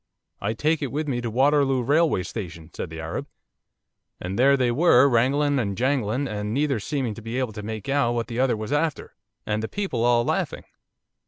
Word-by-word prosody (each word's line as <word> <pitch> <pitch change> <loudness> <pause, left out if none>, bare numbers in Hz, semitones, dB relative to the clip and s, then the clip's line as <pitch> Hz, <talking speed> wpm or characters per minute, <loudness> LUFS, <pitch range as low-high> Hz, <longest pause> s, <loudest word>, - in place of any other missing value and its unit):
"I 100 +2 -1
take 155 +7 0
it 140 - -3
with 150 +2 -2
me 125 -4 -1
to 120 - -3
Waterloo 135 +1 +2
Railway 145 - +2
Station," 85 -7 -7
said - - -5
the 80 0 -8
Arab, 80 0 -4 0.9
and 95 +5 -4
there 140 +2 +5
they 125 -2 +2
were, 140 -1 +5
wrangling 140 +3 +2
and 100 -5 -2
jangling, 130 0 0
and 105 0 -3
neither 140 -4 +1
seeming 130 0 -2
to 115 - -10
be 115 +3 -5
able 130 -4 -1
to 105 - -6
make 110 +1 -6
out 135 -4 +2
what 115 -1 -1
the 120 0 -5
other 130 -3 +2
was 110 +3 -5
after, 155 0 -1 0.3
and 105 0 -1
the 110 - -3
people 190 - -2
all 120 -1 +3
laughing. - - -1
120 Hz, 200 wpm, -24 LUFS, 110-140 Hz, 0.9 s, there